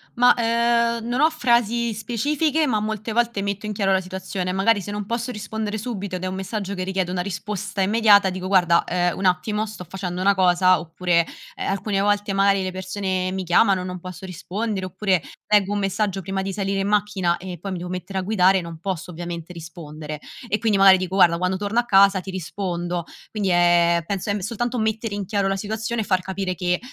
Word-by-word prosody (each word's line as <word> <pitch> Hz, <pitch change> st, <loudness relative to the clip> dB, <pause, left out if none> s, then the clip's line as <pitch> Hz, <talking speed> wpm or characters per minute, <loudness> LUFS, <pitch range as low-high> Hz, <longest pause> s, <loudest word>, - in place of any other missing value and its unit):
Ma, 245 Hz, +1 st, +5 dB
ehm, 235 Hz, 0 st, +1 dB
non 245 Hz, +4 st, 0 dB
ho 315 Hz, -, +6 dB
frasi 235 Hz, -5 st, +1 dB
specifiche 295 Hz, +8 st, 0 dB
ma 220 Hz, -5 st, +1 dB
molte 215 Hz, +1 st, -3 dB
volte 235 Hz, -3 st, +1 dB
metto 200 Hz, +1 st, -3 dB
in 210 Hz, -, -3 dB
chiaro 195 Hz, -1 st, +1 dB
la 190 Hz, 0 st, +3 dB
situazione. 185 Hz, 0 st, -4 dB
Magari 200 Hz, +3 st, +2 dB
se 205 Hz, -, -6 dB
non 205 Hz, 0 st, -4 dB
posso 235 Hz, +2 st, -2 dB
rispondere 215 Hz, -1 st, -4 dB
subito 205 Hz, -4 st, -4 dB
ed 180 Hz, -, -9 dB
è -, -, -1 dB
un 185 Hz, -, -4 dB
messaggio 200 Hz, +1 st, -4 dB
che 185 Hz, -, -3 dB
richiede 185 Hz, -1 st, -1 dB
una 180 Hz, -1 st, -1 dB
risposta 200 Hz, +1 st, -4 dB
immediata, 205 Hz, -1 st, +5 dB
dico: 185 Hz, 0 st, -5 dB
"Guarda, 175 Hz, -3 st, +4 dB
ehm, 175 Hz, -1 st, 0 dB
un 195 Hz, -, -3 dB
attimo, 210 Hz, +4 st, +1 dB
sto 205 Hz, -4 st, -9 dB
facendo 185 Hz, -1 st, -4 dB
una 200 Hz, +1 st, +4 dB
cosa." 185 Hz, -1 st, +4 dB
Oppure, 170 Hz, +1 st, 0 dB, 0.3 s
ehm, -, -, -4 dB
alcune 195 Hz, +1 st, -1 dB
volte 205 Hz, 0 st, +1 dB
magari 195 Hz, 0 st, +3 dB
le 185 Hz, -, -3 dB
persone 185 Hz, 0 st, -2 dB
mi 190 Hz, 0 st, -3 dB
chiamano, 185 Hz, +2 st, +3 dB
non 180 Hz, 0 st, -5 dB
posso 185 Hz, +1 st, -9 dB
rispondere, 190 Hz, +3 st, -4 dB
oppure 185 Hz, -1 st, 0 dB, 0.3 s
leggo 205 Hz, -1 st, +3 dB
un 205 Hz, -, 0 dB
messaggio 195 Hz, 0 st, -1 dB
prima 190 Hz, +1 st, -3 dB
di 195 Hz, 0 st, -3 dB
salire 195 Hz, 0 st, -1 dB
in 195 Hz, -, -1 dB
macchina 205 Hz, -4 st, +1 dB
e 180 Hz, -1 st, -7 dB
poi 195 Hz, +1 st, -5 dB
mi 185 Hz, -, -3 dB
devo 175 Hz, +1 st, -6 dB
mettere 185 Hz, +2 st, -4 dB
a -, -, -1 dB
guidare, 190 Hz, -1 st, +3 dB
non 170 Hz, -1 st, -8 dB
posso 185 Hz, -1 st, -4 dB
ovviamente 170 Hz, 0 st, -6 dB
rispondere 155 Hz, -3 st, -8 dB, 0.3 s
e 215 Hz, -, 0 dB
quindi 220 Hz, -3 st, +2 dB
magari 195 Hz, -1 st, +8 dB
dico: 185 Hz, 0 st, -3 dB
"Guarda, 170 Hz, -3 st, +5 dB
quando 185 Hz, +1 st, 0 dB
torno 205 Hz, +4 st, 0 dB
a 240 Hz, -, 0 dB
casa 195 Hz, -2 st, +5 dB
ti 190 Hz, -, -9 dB
rispondo." 175 Hz, -1 st, -3 dB, 0.3 s
Quindi 205 Hz, -3 st, -1 dB
è 175 Hz, -1 st, +4 dB
penso 200 Hz, +2 st, -3 dB
è -, -, +2 dB
m -, -, -2 dB
soltanto 235 Hz, +5 st, -2 dB
mettere 220 Hz, -1 st, -1 dB
in 200 Hz, -1 st, -3 dB
chiaro 200 Hz, 0 st, 0 dB
la 195 Hz, -, 0 dB
situazione 220 Hz, +3 st, -3 dB
e -, -, -1 dB
far 185 Hz, -2 st, +1 dB
capire 190 Hz, 0 st, -3 dB
che, 180 Hz, 0 st, -1 dB
195 Hz, 215 wpm, -23 LUFS, 185-210 Hz, 0.3 s, magari